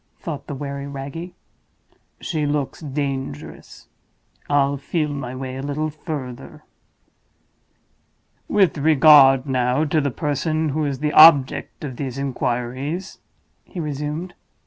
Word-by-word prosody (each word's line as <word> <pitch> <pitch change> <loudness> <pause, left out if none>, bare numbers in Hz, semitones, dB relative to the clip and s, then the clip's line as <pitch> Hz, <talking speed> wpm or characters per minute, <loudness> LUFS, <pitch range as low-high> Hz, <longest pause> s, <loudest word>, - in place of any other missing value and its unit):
thought 145 -4 -7
the 145 - -5
wary 140 0 -5
Wragge. 140 +6 -7 0.9
"She 155 -4 -2
looks 145 -2 -2
dangerous; 135 - -5 0.6
I'll 140 -1 +2
feel 150 +2 -2
my 135 -3 -5
way 130 0 -6
a - - -5
little 150 +2 -2
further." 145 -5 -7 1.8
"With 190 -7 +2
regard, 140 -3 +6
now, 130 +1 +1
to 155 +1 +1
the 140 - 0
person 155 +3 -1
who 150 +2 -1
is 140 -2 -2
the 150 0 0
object 155 -4 +6
of 130 -5 -6
these 135 -2 -5
inquiries," 135 +6 -3 0.4
he 185 - -9
resumed. 150 +3 -4
145 Hz, 120 wpm, -21 LUFS, 135-155 Hz, 1.8 s, regard